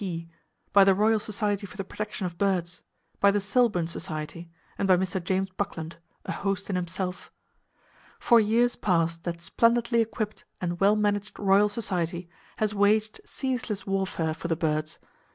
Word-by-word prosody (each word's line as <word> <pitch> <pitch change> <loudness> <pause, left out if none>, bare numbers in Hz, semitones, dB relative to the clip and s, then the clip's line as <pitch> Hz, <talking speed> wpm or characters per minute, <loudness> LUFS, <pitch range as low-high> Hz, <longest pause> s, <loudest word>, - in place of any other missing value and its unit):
P., 170 -3 -4 0.5
by 200 0 +8
the 195 -1 +5
Royal 215 +2 +3
Society 205 -1 -1
for 190 - -14
the 195 - -2
Protection 210 0 -5
of 170 -1 -6
Birds, 180 -3 0 0.4
by 200 - +6
the 205 +1 +2
Selbourne 205 -3 +2
Society, 165 +1 -5 0.3
and 195 - -1
by 185 -1 +6
Mr. 185 0 -2
James 190 +2 -1
Buckland—a 170 -4 -6
host 195 0 -2
in - - -1
himself. 180 +1 -3 0.9
For 235 - +5
years 230 +3 +3
past 165 -5 0
that 170 -1 -4
splendidly 235 +3 +2
equipped 215 -1 -3 0.2
and 175 -1 -3
well 200 +2 +5
managed 205 0 -1
Royal 200 +1 +4
Society 180 -5 -2 0.3
has 215 -1 0
waged 210 +1 +2
[Page - - -22
136] - - -12
ceaseless 245 -6 -2
warfare 190 -5 -1
for 155 - -6
the 165 - +1
birds. 155 -1 -1
195 Hz, 165 wpm, -27 LUFS, 175-210 Hz, 0.9 s, by